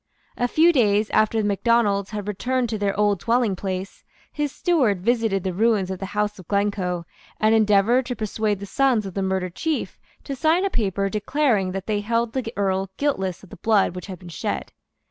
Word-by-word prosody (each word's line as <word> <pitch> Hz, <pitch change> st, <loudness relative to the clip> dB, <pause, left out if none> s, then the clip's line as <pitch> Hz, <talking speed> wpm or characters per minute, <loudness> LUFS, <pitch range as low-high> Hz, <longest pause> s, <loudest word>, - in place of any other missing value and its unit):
A 245 Hz, -, 0 dB
few 330 Hz, +7 st, +4 dB
days 215 Hz, -5 st, +2 dB
after 215 Hz, +1 st, +2 dB
the 210 Hz, -, +1 dB
Macdonalds 205 Hz, -1 st, +2 dB
had 210 Hz, -2 st, -5 dB
returned 245 Hz, +4 st, -1 dB
to 215 Hz, -1 st, -3 dB
their 200 Hz, -1 st, -1 dB
old 205 Hz, -3 st, +2 dB
dwellingplace, 195 Hz, -5 st, -1 dB, 0.3 s
his 295 Hz, -2 st, -2 dB
steward 270 Hz, -, +1 dB
visited 225 Hz, -3 st, +1 dB
the 185 Hz, -, -2 dB
ruins 205 Hz, -1 st, +2 dB
of 190 Hz, -, -5 dB
the 195 Hz, -, -4 dB
house 210 Hz, -1 st, 0 dB
of 180 Hz, -, -13 dB
Glencoe, 200 Hz, -4 st, -1 dB, 0.3 s
and 215 Hz, +1 st, +3 dB
endeavoured 220 Hz, +3 st, +3 dB
to 245 Hz, -, -3 dB
persuade 215 Hz, -2 st, -1 dB
the 200 Hz, -, -6 dB
sons 245 Hz, 0 st, +1 dB
of 190 Hz, -, -6 dB
the 195 Hz, -, -2 dB
murdered 190 Hz, -2 st, -1 dB
chief 320 Hz, -, -3 dB, 0.2 s
to 275 Hz, -, -5 dB
sign 325 Hz, +7 st, +2 dB
a 395 Hz, -, -1 dB
paper 200 Hz, -, 0 dB
declaring 210 Hz, -1 st, +1 dB
that 195 Hz, 0 st, -4 dB
they 210 Hz, -1 st, 0 dB
held 230 Hz, +2 st, -1 dB
the 255 Hz, -4 st, -3 dB
Earl 195 Hz, -1 st, 0 dB
guiltless 190 Hz, -12 st, -1 dB
of 195 Hz, -, -15 dB
the -, -, -10 dB
blood 205 Hz, -1 st, +2 dB
which 180 Hz, -, -7 dB
had 190 Hz, -2 st, -7 dB
been 180 Hz, 0 st, -12 dB
shed. 165 Hz, -, -4 dB
210 Hz, 200 wpm, -23 LUFS, 195-235 Hz, 0.3 s, few